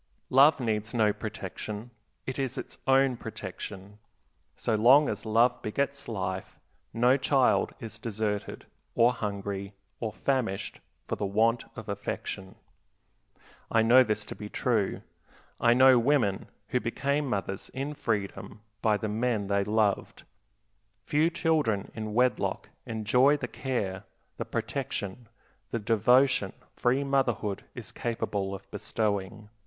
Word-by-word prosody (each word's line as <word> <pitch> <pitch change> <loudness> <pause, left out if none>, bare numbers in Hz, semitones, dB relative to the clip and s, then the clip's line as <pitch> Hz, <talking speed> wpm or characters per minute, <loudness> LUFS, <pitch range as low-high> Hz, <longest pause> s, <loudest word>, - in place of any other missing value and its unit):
Love 140 +4 +6
needs 110 -1 -2
no 110 -3 +3
protection; 105 +1 -6 0.3
it 130 +1 -4
is 130 -2 -2
its - - -6
own 135 -1 +4
protection. 105 -2 -8 0.6
So 115 - -1
long 130 +7 +6
as - - -4
love 115 +3 +3
begets 140 +5 -2
life 95 -4 -4 0.3
no 125 +3 +4
child 135 -1 +2
is 115 -1 -8
deserted, 105 -2 -3 0.3
or 120 +2 +5
hungry, 100 -3 -4 0.3
or 110 -2 -2
famished 120 -6 -2 0.3
for - - -2
the 100 - -1
want 115 +4 +2
of 110 -2 -8
affection. 100 -1 -5 1.1
I 115 - +3
know 120 +3 +7
this 105 -3 -2
to - - -7
be 105 - -8
true. 110 -5 0 0.6
I 120 0 +5
know 130 0 +7
women 120 -6 +1 0.2
who 125 - +1
became 140 +5 -1
mothers 100 -4 -3
in 140 +3 -4
freedom 105 -4 -3 0.2
by 110 -2 +3
the 110 - -3
men 110 0 0
they 100 0 +2
loved. 105 -1 0 0.8
Few 155 +3 +2
children 150 - 0
in 110 -1 -5
wedlock 125 +1 +1 0.2
enjoy 125 +6 +3
the - - -4
care, 100 -7 -3 0.3
the - - -3
protection, 110 +4 -4 0.4
the - - -1
devotion 115 +1 +3 0.2
free 130 +3 +1
motherhood 125 -7 0
is - - -7
capable 100 -4 -2
of - - -13
bestowing. 105 -1 -2
110 Hz, 130 wpm, -28 LUFS, 105-125 Hz, 1.1 s, know